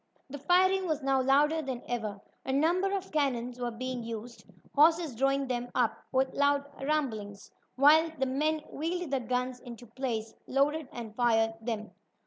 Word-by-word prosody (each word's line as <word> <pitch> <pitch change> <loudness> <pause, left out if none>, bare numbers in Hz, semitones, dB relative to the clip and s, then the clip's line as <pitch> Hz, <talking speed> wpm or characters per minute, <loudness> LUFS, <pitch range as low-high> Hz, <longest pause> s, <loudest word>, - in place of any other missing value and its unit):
The 285 - -6
firing 370 +5 +3
was 310 -3 -1
now 270 -1 +2
louder 295 +4 +3
than 260 -4 -5
ever. 215 -4 -3 0.2
A - - -3
number 345 +8 +2
of 385 -1 -3
cannon 250 -5 0
were 245 -1 -1
being 255 +1 -4
used, 230 +1 -7 0.3
horses 320 0 +4
drawing 275 +3 +1
them 245 -1 -3
up - - +2 0.2
with 265 0 +1
loud 285 0 +2 0.2
rumblings, 220 -9 -2 0.2
while 310 +4 +6
the 265 - +1
men 300 +4 0
wheeled 335 +1 -3
the 270 - +1
guns 250 +1 -2
into 240 0 -10
place, 225 -2 -4
loaded 285 +2 +1
and 225 -3 -8
fired 225 -2 +2
them. 220 -2 -4
265 Hz, 160 wpm, -30 LUFS, 240-300 Hz, 0.3 s, while